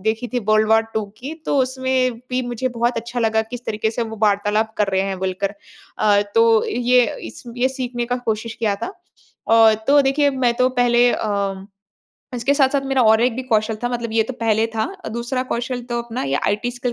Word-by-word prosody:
देखी 220 +4 -1
थी 250 - +1
world 215 0 +4
war 225 0 +5
2 220 -1 0
की 275 +5 -6
तो 285 - +1
उसमें 260 -1 0 0.2
भी 255 0 0
मुझे 245 +2 -2
बहुत 235 +1 0
अच्छा 235 +2 -4
लगा 220 -1 +2
किस 245 +2 -9
तरीके 220 0 -1
से 235 +1 -2
वो 225 -1 -6
वार्तालाप 210 +1 +1
कर 210 - +2
रहे 190 - +2
हैं 195 -1 -3
बोलकर। 190 +2 -2 0.4
अ, 205 -1 +4
तो 225 -1 +4
ये 245 +1 +3 0.2
इस - - -10
ये 255 +2 +2
सीखने 250 -2 -4
का - - +2
कोशिश 230 -2 -3
किया 215 -3 0
था। - - -1 0.6
अ, 225 -1 +6
तो 285 +1 +6
देखिए 285 +1 +2
मैं 255 -3 +1
तो 255 0 +3
पहले 245 0 +4
अम, 200 -2 -2 0.7
इसके 245 +4 +1
साथ-साथ 275 -1 +2
मेरा 270 -2 +2
और 220 0 +5
एक 245 -1 +1
भी 260 - -3
कौशल 220 0 +1
था - - +1
मतलब 235 -2 -4
ये 225 - +3
तो 225 - -6
पहले 225 0 +2
था। 220 - 0 0.2
अ, - - -4
दूसरा 235 +3 -2
कौशल 245 +1 -3
तो 235 - -1
अपना 235 +1 -5
ये 140 +1 0
आईटी 210 +4 0
स्किल 245 0 -3
235 Hz, 215 wpm, -20 LUFS, 220-250 Hz, 0.7 s, अ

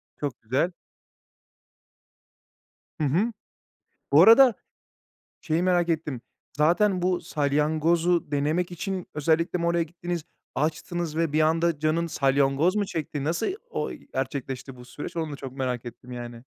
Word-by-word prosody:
Çok 140 -5 -4
güzel. 130 +10 0 2.3
Hı - - +2
hı. 190 - +1 0.8
Bu 150 - +8
arada, 230 +4 +8 0.9
şeyi 165 +2 0
merak 175 -2 +2
ettim. 155 -6 -1 0.4
Zaten 180 +5 +3
bu 180 0 +1
salyangozu 155 +3 +1
denemek 155 +5 0
için, 185 +1 -4
özellikle 165 +4 +1
mi 170 - -1
oraya 170 0 +2
gittiniz? 170 0 -5 0.3
Açtınız 160 +2 -2
ve 165 -2 +1
bir 155 - +2
anda 165 0 +2
canın 155 +3 +1
salyangoz 140 +4 +2
mu 205 - +1
çekti? 150 -5 -4
Nasıl, 165 +3 0 0.2
o, - - -2
gerçekleşti 135 -2 -5
bu 125 - -12
süreç? 145 +6 -8
Onu 160 -2 -2
da - - -5
çok 135 -2 -7
merak 125 -3 -3
ettim 120 +1 -10
yani. 120 -1 -7
160 Hz, 135 wpm, -26 LUFS, 140-175 Hz, 2.3 s, Bu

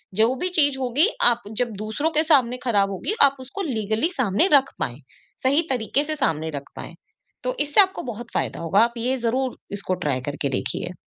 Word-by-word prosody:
जो 225 +4 +3
भी 360 +8 -2
चीज़ 285 -3 +3
होगी, 265 - +3
आप 240 - +4
जब 245 -2 0
दूसरों 285 +10 -2
के - - +4
सामने 260 -6 +3
खराब 200 -5 +2
होगी, 195 - -3
आप 275 -1 +4
उसको 270 +10 -7
लीगली 225 - -1
सामने 225 - +2
रख 275 -2 +4
पाएँ, 125 +4 -4 0.4
सही 275 +4 +4
तरीके 260 +2 0
से 310 +1 -3
सामने 160 - -1
रख 140 - -10
पाएँ। - - -8 0.5
तो - - -1
इससे 295 +7 +5
आपको 380 -1 0
बहुत 240 -1 -7
फ़ायदा - - -2
होगा, 170 +4 +2
आप 235 +1 +2
ये 250 +3 +1
ज़रूर 255 +2 -1 0.2
इसको 200 -2 -2
ट्राई 135 -4 -1
करके 145 -1 -3
देखिए। 175 +6 -3
245 Hz, 195 wpm, -23 LUFS, 205-285 Hz, 0.5 s, इससे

